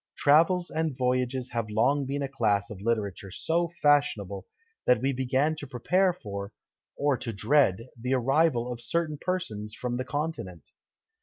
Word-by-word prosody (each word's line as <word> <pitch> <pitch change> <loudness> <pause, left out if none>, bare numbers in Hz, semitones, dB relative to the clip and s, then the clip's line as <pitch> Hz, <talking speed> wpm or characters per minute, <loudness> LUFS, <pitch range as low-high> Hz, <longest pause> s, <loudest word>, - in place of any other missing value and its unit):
Travels 170 +5 +4
and 160 -4 -1
voyages 125 0 0
have 115 -2 -2
long 135 +6 +2
been 140 +1 -2
a - - -1
class 105 -6 0
of 95 -2 -8
literature 105 -3 -2
so 165 - 0
fashionable, 110 -10 +2 0.4
that 125 -2 +5
we 135 +3 0
begin 130 +4 +1
to 145 - -7
prepare 180 +10 +2
for, 100 - -7 0.5
or 145 -2 +2
to 120 - -4
dread, 115 0 +2
the 125 +3 -1
arrival 130 -1 +2
of 120 - -9
certain 155 0 -1
persons 115 - -3
from 120 0 -3
the 130 - -2
Continent! 145 - -4
130 Hz, 155 wpm, -28 LUFS, 110-150 Hz, 0.5 s, that